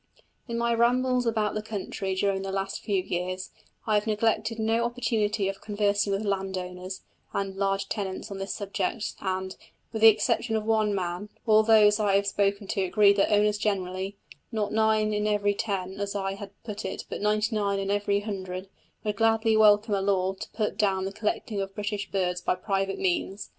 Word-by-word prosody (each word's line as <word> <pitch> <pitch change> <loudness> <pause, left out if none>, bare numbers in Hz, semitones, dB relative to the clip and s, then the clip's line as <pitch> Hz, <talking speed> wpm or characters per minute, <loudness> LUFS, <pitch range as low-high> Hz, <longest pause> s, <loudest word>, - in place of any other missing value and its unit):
In 235 -1 -3
my 235 0 +1
rambles 250 +1 +2
about 215 -2 +1
the 215 - -2
country 195 -2 -4
during 195 0 +1
the 195 0 -4
last 195 0 -3
few 195 -3 0
years, 185 +1 -3 0.3
I 220 - +1
have 210 +1 +2
neglected 220 +1 +1
no 225 +1 +1
opportunity 225 -4 0
of 195 0 -4
conversing 205 -1 +1
with 195 +2 -1
landowners 185 -1 -3 0.3
and 195 -1 -2
large 195 0 0
tenants 195 -2 -4
on 195 - -5
this 195 0 -4
subject, 205 +1 -2
and, 190 0 -2 0.4
with 220 - -3
the 225 - +10
exception 225 +1 +3
of 215 -1 -1
one 215 -2 +2
man, 180 +2 -3 0.2
all 215 -1 +6
those 215 -1 +5
I 205 -2 +2
have 200 0 +3
spoken 200 0 0
to 200 - 0
agreed 200 +2 +4
that 200 - +3
owners 210 0 +3
generally 195 -1 -2 0.3
not 215 -3 -1
nine 215 -1 +2
in 210 0 0
every 205 -1 +2
ten, 195 -3 -2
as 200 0 -3
I 195 -1 -1
had 195 0 -8
put 210 -2 -6
it, 190 - -5
but - - -5
ninety 210 +2 +1
nine 200 -2 +1
in 195 0 -1
every 205 0 +1
hundred 190 -2 -5 0.3
would 210 -2 -2
gladly 225 0 +3
welcome 210 0 +5
a 195 - +1
law 190 -1 +1
to 190 - -8
put 210 -2 -2
down 190 -3 +2
the 195 - -4
collecting 210 0 -2
of 195 0 -5
British 205 -1 -3
birds 180 -2 -1
by - - +1
private 195 0 -1
persons. 190 +2 -1
205 Hz, 190 wpm, -27 LUFS, 195-215 Hz, 0.4 s, the